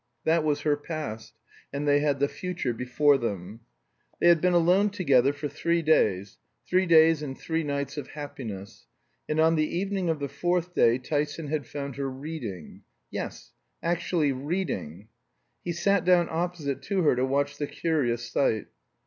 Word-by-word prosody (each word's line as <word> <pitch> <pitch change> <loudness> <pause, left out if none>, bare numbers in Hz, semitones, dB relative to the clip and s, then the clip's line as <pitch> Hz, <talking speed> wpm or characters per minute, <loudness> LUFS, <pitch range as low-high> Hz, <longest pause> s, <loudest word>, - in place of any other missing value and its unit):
That 160 0 +2
was 150 -1 0
her 150 -1 +2
past; 145 -8 -6 0.4
and 140 +1 -3
they 145 0 +5
had 145 -2 +1
the 140 - +3
future 180 -7 -3
before 135 +4 +2
them. 100 -2 -4 0.6
They 175 - +5
had 170 -2 +5
been 180 0 +3
alone 180 +5 +4
together 140 -10 +3
for 145 +1 -5
three 170 +3 0
days, 100 -11 +2 0.3
three 185 +1 +2
days 160 -2 +6
and 135 -3 -5
three 160 0 -2
nights 140 0 -3
of 145 - -5
happiness; 115 -10 -8 0.4
and 155 +1 0
on 160 +1 +4
the 155 +2 0
evening 195 -1 -1
of 160 - +1
the 140 -1 -3
fourth 175 +3 -1
day 115 -6 +4
Tyson 145 +3 -2
had 150 -2 -2
found 140 -2 -6
her 140 -1 -2
reading 130 - -7 0.3
yes, - - -6 0.3
actually 170 -3 +1
reading! 130 - -4 0.5
He 175 - -2
sat 190 +2 +1
down 180 -1 +4
opposite 160 -4 -2
her 185 -9 +2
to 125 - 0
watch 140 +2 0
the 145 - -1
curious 120 -9 -1
sight. 115 -3 0
150 Hz, 165 wpm, -27 LUFS, 135-170 Hz, 0.6 s, days